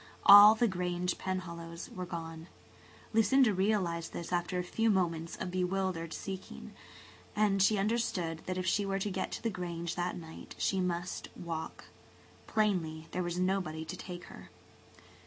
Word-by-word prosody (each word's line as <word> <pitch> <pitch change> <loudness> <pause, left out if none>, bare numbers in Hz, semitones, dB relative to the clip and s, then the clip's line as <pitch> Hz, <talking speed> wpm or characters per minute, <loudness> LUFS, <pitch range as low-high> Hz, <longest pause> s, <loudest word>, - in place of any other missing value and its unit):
All 205 +2 +11
the 235 +2 +2
Grange 180 -2 -2
Penhallows 170 -1 -5
were 180 -1 -5
gone; 165 -1 -6 0.7
Lucinda 225 +2 +4
realized 185 -4 0
this 170 +1 -5
after 175 +1 0
a 180 - 0
few 225 +5 0
moments 170 -4 0
of 180 - -5
bewildered 180 -2 -1
seeking, 190 +1 -7 0.6
and 205 -2 +2
she 210 +2 +4
understood 195 -6 -1
that 185 0 -2
if 185 - -2
she 205 +2 +2
were 195 0 -1
to 195 +1 -2
get - - -3
to - - -6
the 230 - 0
Grange 170 -2 -4
that 180 0 -2
night 160 -2 -10
she 190 - 0
must 180 -1 -2
walk. 165 -2 -5 0.6
Plainly 165 -7 0
there 180 - -2
was 175 0 -3
nobody 180 -4 -1
to 175 - -6
take 180 -1 -8
her. - - -12
180 Hz, 155 wpm, -32 LUFS, 170-195 Hz, 0.7 s, All